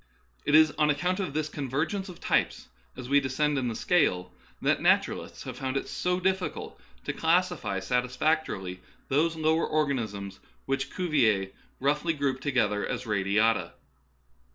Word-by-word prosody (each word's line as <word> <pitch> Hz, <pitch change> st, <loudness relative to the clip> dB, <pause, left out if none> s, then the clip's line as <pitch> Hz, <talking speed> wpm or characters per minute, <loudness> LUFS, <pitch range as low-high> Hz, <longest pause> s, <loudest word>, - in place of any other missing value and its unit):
It 145 Hz, -, +3 dB
is 155 Hz, -1 st, +7 dB
on 150 Hz, 0 st, +4 dB
account 180 Hz, +6 st, 0 dB
of 160 Hz, -8 st, -3 dB
this 155 Hz, -1 st, 0 dB
convergence 155 Hz, +8 st, -2 dB
of 175 Hz, -, -10 dB
types -, -, 0 dB, 0.3 s
as 125 Hz, -, -7 dB
we 140 Hz, +2 st, +5 dB
descend 140 Hz, +2 st, 0 dB
in 125 Hz, -, -1 dB
the 115 Hz, -, -2 dB
scale 90 Hz, -, +1 dB, 0.3 s
that -, -, +1 dB
naturalists -, -, +1 dB
have -, -, -7 dB
found 130 Hz, 0 st, -2 dB
it -, -, -3 dB
so 180 Hz, 0 st, -1 dB
difficult 190 Hz, 0 st, -2 dB, 0.2 s
to -, -, -3 dB
clas 175 Hz, +3 st, +3 dB
sify 100 Hz, -, -4 dB
satisfactorily 125 Hz, -, -1 dB, 0.3 s
those 160 Hz, +4 st, +2 dB
lower 160 Hz, +1 st, +2 dB
organisms 110 Hz, -10 st, -2 dB, 0.3 s
which 135 Hz, 0 st, -1 dB
Cu 180 Hz, -1 st, -3 dB
vier 110 Hz, -10 st, +2 dB, 0.3 s
roughly 150 Hz, +5 st, +1 dB
grouped 140 Hz, -3 st, -1 dB
together 125 Hz, -7 st, +1 dB
as 130 Hz, -, -3 dB
radiata. 105 Hz, +2 st, +1 dB
140 Hz, 155 wpm, -28 LUFS, 120-160 Hz, 0.3 s, is